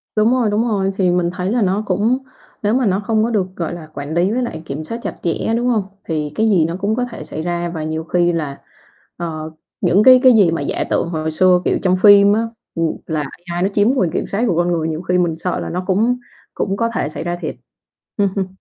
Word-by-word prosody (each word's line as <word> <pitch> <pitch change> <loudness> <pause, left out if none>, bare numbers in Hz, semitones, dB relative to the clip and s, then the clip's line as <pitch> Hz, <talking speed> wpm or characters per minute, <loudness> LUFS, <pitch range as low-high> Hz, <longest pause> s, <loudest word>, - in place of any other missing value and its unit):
Đúng 215 +3 +3
rồi, 240 -4 +2
đúng 225 +3 +1
rồi, 195 -2 0
thì 185 -2 +2
mình 175 -1 +1
thấy 185 +2 -2
là 240 -1 +1
nó 195 +2 +1
cũng 210 +7 +1 0.5
nếu 210 +2 +2
mà 255 -2 +2
nó 195 0 +2
không 215 +1 +1
có 235 - 0
được, 200 -5 0
gọi 170 0 -3
là, 165 -3 -8
quản 145 +2 -5
lý 175 +4 +2
với 250 +2 0
lại 160 -9 -5
kiểm 145 +2 -5
soát 230 +8 -5
chặt - - -4
chẽ, 175 +6 -1
đúng 245 +1 0
hông? 220 -5 +2 0.2
Thì 150 -3 -2
cái 220 0 +2
gì 175 -6 +4
nó 165 +1 -3
cũng 210 +3 0
có 250 0 0
thể - - -7
xảy 155 - -6
ra 175 0 -2
và 160 -2 -5
nhiều 160 +1 -3
khi 175 +1 +1
là, 150 -4 -4 0.6
ờ, 160 -2 -5 0.3
những 200 +4 +4
cái 255 -1 +8
cái 255 -1 +8
gì 195 -7 +5
mà 165 - -2
giả - - -2
tưởng 170 - 0
hồi 160 -1 -2
xưa, 180 +2 +4
kiểu, - - +1
trong 185 0 +3
phim 205 -1 +8
á, 220 - +2 0.3
ừm, 165 -1 -1
là 155 -2 -1 0.3
AI 175 0 -3
nó - - +3
chiếm 205 +3 +2
quyền 180 -9 +1
kiểm - - -2
soát 210 +5 -1
của 175 - +1
con 175 0 +2
người, 160 -2 0
nhiều 160 +2 -3
khi 180 0 0
mình 170 -3 +1
sợ 175 +2 -3
là - - -4
nó 180 +1 -3
cũng 225 +6 +2 0.4
cũng 195 0 -2
có 230 0 +1
thể 145 - -1
xảy 160 - -6
ra 175 0 -2
thiệt. - - -4 0.6
Ừm, 200 -1 +2
ừm. 195 -2 -1
185 Hz, 260 wpm, -18 LUFS, 165-215 Hz, 0.6 s, cái